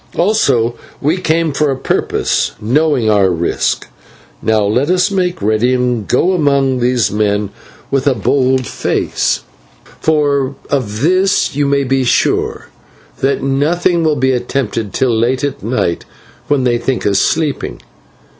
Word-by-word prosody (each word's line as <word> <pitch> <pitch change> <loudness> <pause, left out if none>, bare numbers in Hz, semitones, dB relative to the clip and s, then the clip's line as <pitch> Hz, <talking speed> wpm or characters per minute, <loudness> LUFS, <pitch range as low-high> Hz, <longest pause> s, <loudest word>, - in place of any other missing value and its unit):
Also 140 - +2 0.3
we 155 +6 +1
came 165 -3 0
for 150 +1 +1
a 135 - -1
purpose, 130 - -1
knowing 130 +2 +1
our 100 -3 +3
risk. 85 -1 -1 0.5
Now 110 -1 +1
let 125 +9 +1
us 185 +3 +2
make 180 - -1
ready 110 +4 +2
and 125 -4 -1
go 175 +9 +2
among 140 -5 +1
these 120 -4 +1
men 105 -1 0 0.4
with 135 0 0
a 135 - +3
bold 130 +3 +1
face; - - -1 0.6
for 140 -3 +1 0.2
of 110 -6 -2
this 185 -1 +2
you 145 0 +1
may 140 0 +2
be 135 0 +1
sure, 125 - 0 0.5
that 135 +1 0
nothing 160 +5 +1
will 155 -2 +2
be 130 -1 +1
attempted 120 -4 -2
till 130 -4 +1
late 125 +4 0
at 145 -2 -3
night 110 -6 -1 0.4
when 145 -3 +1
they 120 -1 +1
think 125 +1 -2
us 100 -1 +2
sleeping. 145 - -1
130 Hz, 145 wpm, -15 LUFS, 115-145 Hz, 0.6 s, our